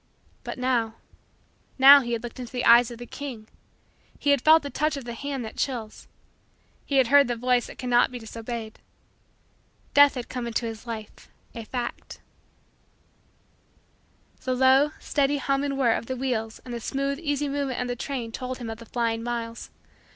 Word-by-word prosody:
But -, -, -6 dB
now 240 Hz, -3 st, 0 dB, 0.8 s
now 275 Hz, +2 st, +10 dB
he 240 Hz, -2 st, -3 dB
had 230 Hz, -, -3 dB
looked 240 Hz, +1 st, -8 dB
into 245 Hz, -2 st, -7 dB
the 250 Hz, -1 st, -2 dB
eyes 235 Hz, 0 st, +7 dB
of 235 Hz, -, -9 dB
the 240 Hz, -, -8 dB
King. 245 Hz, -6 st, -8 dB, 0.7 s
He 290 Hz, -, +1 dB
had 280 Hz, -3 st, +3 dB
felt 315 Hz, +2 st, +6 dB
the 285 Hz, -, -6 dB
touch 305 Hz, 0 st, 0 dB
of 270 Hz, -, -7 dB
the 235 Hz, -, -5 dB
hand 275 Hz, 0 st, -4 dB
that 220 Hz, -, -9 dB
chills. 235 Hz, -5 st, -4 dB, 0.8 s
He 280 Hz, -, -1 dB
had 255 Hz, -3 st, +4 dB
heard 285 Hz, -1 st, +6 dB
the 240 Hz, -, -1 dB
voice 245 Hz, 0 st, +1 dB
that -, -, -11 dB
cannot 245 Hz, -1 st, +2 dB
be 250 Hz, -, -6 dB
disobeyed. 225 Hz, -1 st, -7 dB, 1.1 s
Death 285 Hz, 0 st, +7 dB
had 245 Hz, -2 st, -5 dB
come 250 Hz, -2 st, -4 dB
into 235 Hz, +1 st, -2 dB
his 225 Hz, +1 st, -7 dB
life 220 Hz, -2 st, -8 dB, 0.2 s
a 230 Hz, -1 st, -7 dB
fact. 240 Hz, +1 st, -5 dB, 2.2 s
The 255 Hz, -1 st, -1 dB
low, 265 Hz, +3 st, +5 dB
steady, 285 Hz, 0 st, 0 dB
hum 275 Hz, 0 st, 0 dB
and 280 Hz, -1 st, -2 dB
whirr 245 Hz, -4 st, +3 dB
of 230 Hz, -, -4 dB
the 260 Hz, -, -3 dB
wheels 230 Hz, -4 st, -2 dB
and 245 Hz, -, -7 dB
the 235 Hz, -, -4 dB
smooth, 275 Hz, +4 st, -2 dB
easy 290 Hz, -3 st, -1 dB
movement 280 Hz, -2 st, -2 dB
of 250 Hz, -, -2 dB
the 245 Hz, -, -2 dB
train 245 Hz, -2 st, -4 dB
told 255 Hz, +2 st, -5 dB
him 235 Hz, -3 st, -6 dB
of 225 Hz, -, -8 dB
the 230 Hz, -, -12 dB
flying 230 Hz, -1 st, -1 dB
miles. 230 Hz, -1 st, -5 dB
245 Hz, 185 wpm, -25 LUFS, 230-275 Hz, 2.2 s, now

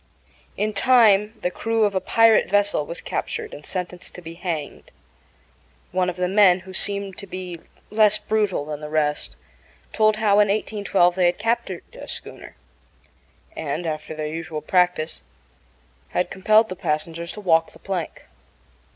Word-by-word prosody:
In 215 Hz, +1 st, -1 dB
time 215 Hz, -2 st, +4 dB
the 180 Hz, -, 0 dB
crew 225 Hz, +3 st, 0 dB
of 205 Hz, -1 st, +2 dB
a 190 Hz, -, +1 dB
pirate 225 Hz, -1 st, +4 dB
vessel 205 Hz, -6 st, +1 dB
was 170 Hz, -, -5 dB
captured -, -, -4 dB
and 145 Hz, -, -9 dB
sentenced 180 Hz, +1 st, -5 dB
to 180 Hz, -, -9 dB
be 165 Hz, 0 st, -8 dB
hanged. 170 Hz, -4 st, -5 dB, 1.0 s
One 180 Hz, 0 st, +1 dB
of 180 Hz, -, -4 dB
the 180 Hz, 0 st, 0 dB
men, 190 Hz, -2 st, +5 dB
who 185 Hz, 0 st, -11 dB
seemed 200 Hz, -1 st, -2 dB
to 200 Hz, -, -8 dB
be 180 Hz, -2 st, -6 dB, 0.3 s
less 210 Hz, -1 st, +4 dB
brutal 210 Hz, -9 st, 0 dB
than 150 Hz, -1 st, -5 dB
the 150 Hz, -, -6 dB
rest, 150 Hz, -1 st, 0 dB, 0.6 s
told 215 Hz, -1 st, +3 dB
how, 210 Hz, -1 st, +3 dB
in 210 Hz, -, +5 dB
1812, 200 Hz, -3 st, +1 dB
they 180 Hz, -1 st, +3 dB
had 175 Hz, -, +1 dB
captured 225 Hz, +3 st, -1 dB
a -, -, -10 dB
schooner, -, -, -8 dB, 1.0 s
and, 155 Hz, +2 st, -3 dB
after 155 Hz, 0 st, -4 dB
their 155 Hz, 0 st, -4 dB
usual 155 Hz, 0 st, -5 dB
practice, 180 Hz, -1 st, +1 dB, 0.9 s
had 180 Hz, -, -1 dB
compelled 215 Hz, +3 st, +3 dB
the 185 Hz, -, -5 dB
passengers 165 Hz, 0 st, -3 dB
to -, -, -9 dB
walk 165 Hz, -5 st, +2 dB
the -, -, -16 dB
plank. 185 Hz, -4 st, -5 dB
185 Hz, 160 wpm, -23 LUFS, 165-210 Hz, 1.0 s, men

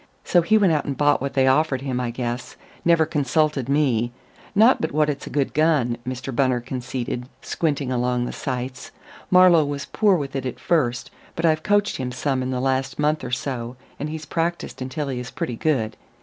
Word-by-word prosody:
So 175 Hz, -, +4 dB
he 190 Hz, +6 st, +3 dB
went 195 Hz, -6 st, +4 dB
out 150 Hz, -, 0 dB
and 140 Hz, -, -3 dB
bought 145 Hz, -2 st, +3 dB
what 140 Hz, 0 st, -3 dB
they 135 Hz, -1 st, +4 dB
offered 135 Hz, 0 st, +2 dB
him, 130 Hz, -2 st, -2 dB
I 125 Hz, -1 st, -1 dB
guess 120 Hz, +1 st, -4 dB, 0.3 s
never 165 Hz, -2 st, +4 dB
consulted 150 Hz, -2 st, 0 dB
me. 130 Hz, -5 st, +2 dB, 0.4 s
Not 225 Hz, +5 st, +5 dB
but 160 Hz, -, -1 dB
what 150 Hz, 0 st, +3 dB
it's 140 Hz, -, -7 dB
a -, -, -5 dB
good 140 Hz, -2 st, -1 dB
gun," 150 Hz, -6 st, +2 dB
Mr. 130 Hz, 0 st, -4 dB
Bunner 130 Hz, -1 st, +2 dB
conceded, 125 Hz, 0 st, -4 dB
squinting 145 Hz, -5 st, -1 dB
along 125 Hz, 0 st, 0 dB
the -, -, -4 dB
sights. 130 Hz, -1 st, -4 dB, 0.4 s
"Marlowe 180 Hz, -3 st, +6 dB
was 145 Hz, -1 st, -4 dB
poor 210 Hz, -3 st, +3 dB
with 140 Hz, -3 st, -5 dB
it 130 Hz, -1 st, -2 dB
at 125 Hz, -, -6 dB
first, 130 Hz, -7 st, 0 dB, 0.2 s
but 165 Hz, -, -1 dB
I've 155 Hz, -1 st, +3 dB
coached 205 Hz, +1 st, +1 dB
him 125 Hz, -1 st, -3 dB
some 130 Hz, +1 st, -1 dB
in 130 Hz, -, -2 dB
the 130 Hz, -1 st, -1 dB
last 135 Hz, +1 st, -1 dB
month 150 Hz, +1 st, +1 dB
or -, -, -4 dB
so, 125 Hz, -1 st, -3 dB, 0.2 s
and 145 Hz, -, -3 dB
he's 155 Hz, 0 st, -6 dB
practised 170 Hz, -3 st, -3 dB
until 140 Hz, +3 st, -3 dB
he 130 Hz, -2 st, -3 dB
is 125 Hz, 0 st, -6 dB
pretty 120 Hz, -, -4 dB
good. 115 Hz, -5 st, 0 dB
135 Hz, 205 wpm, -23 LUFS, 125-155 Hz, 0.4 s, Marlowe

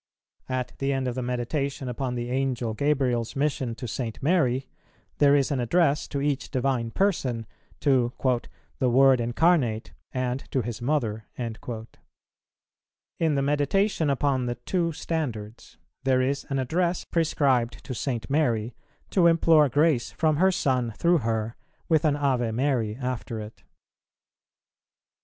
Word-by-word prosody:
At 130 Hz, -1 st, -2 dB
the 135 Hz, 0 st, 0 dB
end 135 Hz, -1 st, -1 dB
of 125 Hz, -, -1 dB
the 130 Hz, -, -3 dB
Meditation 130 Hz, +3 st, -2 dB
upon 125 Hz, +1 st, -3 dB
the 120 Hz, 0 st, -3 dB
Angel 130 Hz, -3 st, -1 dB
Gabriel's 130 Hz, -3 st, 0 dB
mission 135 Hz, -4 st, -1 dB
to 125 Hz, +1 st, -6 dB
St. 115 Hz, 0 st, -4 dB
Mary, 135 Hz, -6 st, +2 dB, 0.5 s
there 145 Hz, 0 st, +6 dB
is 140 Hz, 0 st, +2 dB
an 140 Hz, -, 0 dB
address 150 Hz, +4 st, +2 dB
to 140 Hz, -, -3 dB
each 140 Hz, -1 st, -1 dB
Divine 125 Hz, -3 st, 0 dB
Person, 125 Hz, -, 0 dB, 0.4 s
to 130 Hz, -4 st, +3 dB, 0.7 s
"the 130 Hz, -, +2 dB
Word 130 Hz, 0 st, +5 dB
Incarnate 120 Hz, -2 st, +1 dB, 0.2 s
and 130 Hz, 0 st, -1 dB
to 130 Hz, -, 0 dB
His 115 Hz, -1 st, -5 dB
Mother." 120 Hz, -6 st, -1 dB
In 120 Hz, +6 st, -7 dB
the 140 Hz, -, +1 dB
Meditation 150 Hz, +4 st, +1 dB
upon 135 Hz, -2 st, +1 dB
the 120 Hz, -, -2 dB
Two 170 Hz, +6 st, -1 dB
Standards, 120 Hz, -10 st, -5 dB, 0.3 s
there 130 Hz, -1 st, +3 dB
is 140 Hz, +2 st, -1 dB
an 135 Hz, -, -1 dB
address 170 Hz, +7 st, 0 dB
prescribed 140 Hz, -7 st, +1 dB
to 130 Hz, -, -4 dB
St. 120 Hz, -3 st, -3 dB
Mary 120 Hz, -6 st, +1 dB, 0.4 s
to 180 Hz, -3 st, +5 dB
implore 165 Hz, -3 st, +5 dB
grace 145 Hz, -1 st, +2 dB
from 155 Hz, -2 st, +1 dB
her 190 Hz, +3 st, +4 dB
Son 125 Hz, -8 st, 0 dB
through 170 Hz, 0 st, +3 dB
her, 115 Hz, -1 st, -2 dB, 0.3 s
with 160 Hz, -1 st, +3 dB
an 150 Hz, -2 st, +3 dB
Ave 130 Hz, -5 st, +1 dB
Mary 115 Hz, -2 st, 0 dB
after 125 Hz, -3 st, -4 dB
it. 105 Hz, +1 st, -10 dB
130 Hz, 140 wpm, -26 LUFS, 120-145 Hz, 0.7 s, there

